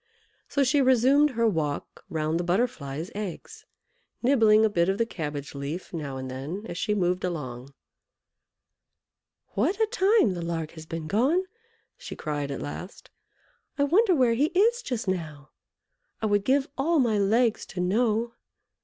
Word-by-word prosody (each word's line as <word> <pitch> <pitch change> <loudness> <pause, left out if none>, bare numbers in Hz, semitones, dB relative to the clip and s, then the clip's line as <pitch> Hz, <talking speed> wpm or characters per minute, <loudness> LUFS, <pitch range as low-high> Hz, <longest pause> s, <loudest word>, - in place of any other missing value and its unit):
So 280 - +2
she 280 +2 +3
resumed 260 +3 +4
her 230 -3 +1
walk 155 -8 -2
round 155 +1 -1
the - - -1
Butterfly's 175 - -1
eggs, 210 - -7 0.6
nibbling 220 -4 +5
a - - +5
bit 175 -4 +1
of 195 - 0
the 230 - +2
cabbage 150 -8 -5
leaf 145 +7 -6
now 145 -5 -4
and 130 0 -5
then 150 +11 -6
as - - -6
she 210 - 0
moved 180 -2 0
along. 135 -6 -5 1.7
"What 390 +3 0
a 440 - +4
time 420 - +3
the 175 - -5
Lark 165 -2 -3
has 160 -1 -11
been 165 -1 -5
gone!" 260 - +2 0.6
she - - -8
cried, 145 -2 -3
at 140 - -4
last. 180 +6 -8 0.7
"I 285 - +2
wonder 370 +6 +4
where 250 -5 +3
he 265 +6 +2
is 470 +5 +4
just 245 - -4
now! 155 -6 -4 0.7
I - - -2
would 205 -1 +1
give 270 +2 +2
all 325 +5 +2
my 230 -7 +2
legs 225 +3 +2
to 180 - -7
know!" 225 +5 +1
205 Hz, 160 wpm, -26 LUFS, 160-255 Hz, 1.7 s, nibbling